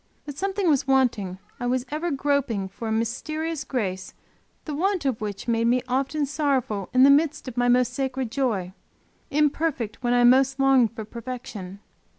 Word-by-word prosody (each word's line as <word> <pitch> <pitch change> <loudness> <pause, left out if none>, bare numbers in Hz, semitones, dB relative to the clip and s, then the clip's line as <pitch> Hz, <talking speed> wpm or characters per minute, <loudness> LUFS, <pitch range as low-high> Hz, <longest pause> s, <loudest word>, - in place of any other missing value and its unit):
But 290 -2 -7
something 390 +3 -1
was 285 -3 +2
wanting 235 -9 +1 0.2
I 245 - -2
was 250 0 0
ever 315 +4 -2
groping 275 - 0
for 225 +4 -7
a - - -2
mysterious 310 +8 -2
grace 195 -9 -3 0.5
the 305 - -4
want 365 +2 0
of 255 -5 -1
which 205 0 -5
made 230 0 +1
me 250 +1 +2
often 275 +4 0
sorrowful 270 - -1
in 255 +1 +5
the 280 - +8
very 280 - +8
midst 310 -2 -2
of 255 - -6
my 245 0 +1
most 250 0 +3
sacred 265 -2 -2
joy, 215 -10 -1 0.6
imperfect 295 -6 0
when 245 -1 +1
I 245 - +4
most 265 +2 +4
longed 265 -4 +4
for 220 -3 -6
perfection. 215 -5 -7
255 Hz, 175 wpm, -25 LUFS, 230-285 Hz, 0.6 s, the